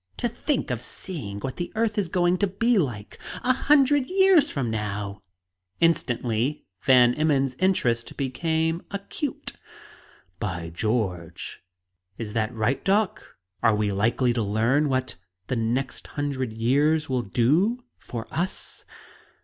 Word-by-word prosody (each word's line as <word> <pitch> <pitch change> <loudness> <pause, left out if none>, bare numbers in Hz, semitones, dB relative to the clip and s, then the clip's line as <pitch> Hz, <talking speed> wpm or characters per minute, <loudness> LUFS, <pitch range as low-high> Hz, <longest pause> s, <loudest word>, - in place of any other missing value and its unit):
To 240 - 0
think 240 - -1
of 120 -2 -2
seeing 120 - -6
what 130 +2 -4
the 175 - -4
earth 220 -1 +1
is 200 -5 0
going 175 +1 +2
to 205 - +3
be 230 +4 +2
like, 120 - -3 0.2
a 255 - +4
hundred 275 0 +4
years 375 -5 +5
from 130 - -2
now!" 105 -2 -3 0.6
Instantly 125 -4 +1 0.2
Van 125 -2 +6
Emmon's 140 -3 +1
interest 125 -12 +1
became 160 +4 0
acute. 200 +8 -4 0.9
"By 90 -4 -4
George! 90 -4 -2 0.6
Is 110 -3 -5
that 110 0 0
right, 120 +3 -1
doc? 200 +1 0 0.2
Are 115 -2 +4
we 105 -1 0
likely 115 +5 +2
to 120 - 0
learn 115 +8 +2
what 130 -4 -1 0.3
the 130 - -2
next 120 +4 -2
hundred 140 -4 -3
years 145 +8 +2
will 130 -2 0
do 155 - +2 0.2
for 115 -2 -6
us?" 180 +3 -2
135 Hz, 135 wpm, -25 LUFS, 115-185 Hz, 0.9 s, Van